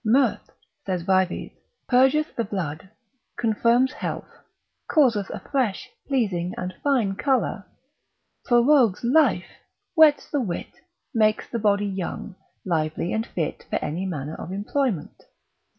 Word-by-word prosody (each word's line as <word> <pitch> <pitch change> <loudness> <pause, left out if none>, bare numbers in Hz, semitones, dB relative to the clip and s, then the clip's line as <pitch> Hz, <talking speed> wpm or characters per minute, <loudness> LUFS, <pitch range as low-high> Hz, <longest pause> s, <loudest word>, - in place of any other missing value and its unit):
Mirth, 245 +1 +2 0.3
(saith 185 -3 -2
Vives) 185 -1 +1 0.4
purgeth 265 +4 +3
the 230 - 0
blood, 185 -5 -4 0.5
confirms 235 +3 +2
health, - - -5 0.6
causeth 235 -10 +3
a 210 - -5
fresh, 240 -3 -2 0.2
pleasing, 195 -10 0
and 180 0 -4
fine 250 -9 +2
colour, 240 -4 0 0.8
prorogues 240 -4 +4
life, 245 - +3 0.5
whets 315 -4 +5
the 290 - +1
wit, 180 -8 -4 0.4
makes 215 -2 +2
the 235 - -1
body 205 -1 +2
young, 195 +1 -4 0.3
lively 165 0 -1
and 220 +1 -1
fit 160 -4 -4
for - - -2
any 180 +5 -3
manner 150 -4 -4
of 170 - -7
employment. 205 - -2
215 Hz, 120 wpm, -24 LUFS, 185-255 Hz, 0.8 s, whets